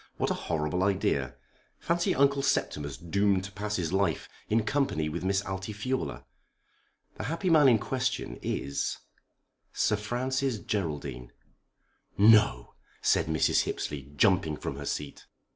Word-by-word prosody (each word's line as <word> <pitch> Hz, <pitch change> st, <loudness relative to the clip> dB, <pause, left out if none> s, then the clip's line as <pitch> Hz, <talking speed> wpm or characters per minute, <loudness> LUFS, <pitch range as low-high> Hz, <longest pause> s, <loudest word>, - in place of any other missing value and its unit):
"What -, -, 0 dB
a -, -, -4 dB
horrible 80 Hz, +2 st, 0 dB
idea! 95 Hz, -10 st, 0 dB, 0.4 s
Fancy 170 Hz, 0 st, 0 dB
Uncle 140 Hz, 0 st, +3 dB
Septimus 75 Hz, -, -1 dB
doomed 100 Hz, +2 st, +1 dB
to 100 Hz, -, -7 dB
pass 105 Hz, +2 st, -3 dB
his 85 Hz, -3 st, -2 dB
life 95 Hz, -6 st, 0 dB, 0.2 s
in 110 Hz, +1 st, +2 dB
company 105 Hz, -, 0 dB
with 85 Hz, +3 st, -4 dB
Miss 95 Hz, +1 st, +1 dB
Altifiorla! 105 Hz, +7 st, -4 dB, 0.9 s
The -, -, -4 dB
happy 170 Hz, +3 st, -1 dB
man 150 Hz, -3 st, +7 dB
in 120 Hz, -, +5 dB
question 130 Hz, +4 st, -2 dB
is 70 Hz, 0 st, -2 dB, 0.8 s
Sir 105 Hz, -, +1 dB
Francis 130 Hz, +4 st, -1 dB
Geraldine." 75 Hz, -, -4 dB, 0.9 s
"No!" 105 Hz, -, +5 dB, 0.3 s
said -, -, +3 dB
Mrs. 80 Hz, 0 st, +2 dB
Hippesley, 70 Hz, -1 st, -4 dB
jumping 85 Hz, -3 st, +3 dB
from -, -, -5 dB
her -, -, -6 dB
seat. 75 Hz, -1 st, -5 dB
100 Hz, 130 wpm, -29 LUFS, 80-120 Hz, 0.9 s, man